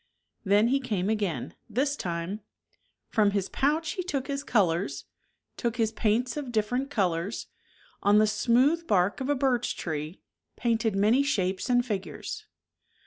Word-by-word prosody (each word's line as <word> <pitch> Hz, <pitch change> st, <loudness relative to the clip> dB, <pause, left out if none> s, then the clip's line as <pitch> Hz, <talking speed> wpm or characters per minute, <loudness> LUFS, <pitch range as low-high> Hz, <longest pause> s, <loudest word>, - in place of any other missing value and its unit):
Then 205 Hz, +3 st, +4 dB
he 275 Hz, +2 st, +3 dB
came 210 Hz, -6 st, -1 dB
again. 195 Hz, -, -2 dB, 0.2 s
This 275 Hz, +6 st, 0 dB
time 175 Hz, -1 st, -3 dB, 0.7 s
From 215 Hz, -3 st, +3 dB
his 195 Hz, -, -2 dB
pouch 310 Hz, +3 st, +1 dB
he 370 Hz, -, -3 dB
took 280 Hz, -7 st, -2 dB
his 280 Hz, 0 st, -3 dB
colors. 170 Hz, -, +1 dB, 0.5 s
Took 235 Hz, -2 st, -1 dB
his 225 Hz, -2 st, +1 dB
paints 230 Hz, +3 st, 0 dB
of 275 Hz, -4 st, -4 dB
different 245 Hz, +5 st, 0 dB
colors, 190 Hz, -5 st, -1 dB, 0.6 s
On 205 Hz, +1 st, +5 dB
the 215 Hz, -, +6 dB
smooth 250 Hz, +10 st, +2 dB
bark 195 Hz, +3 st, +2 dB
of 265 Hz, -, -2 dB
a 290 Hz, -, +3 dB
birch 255 Hz, -3 st, 0 dB
tree 155 Hz, +1 st, -4 dB, 0.4 s
Painted 225 Hz, -3 st, 0 dB
many 215 Hz, +7 st, +4 dB
shapes 195 Hz, -6 st, 0 dB
and 245 Hz, 0 st, +3 dB
figures. 245 Hz, -, -5 dB
225 Hz, 145 wpm, -28 LUFS, 195-265 Hz, 0.7 s, the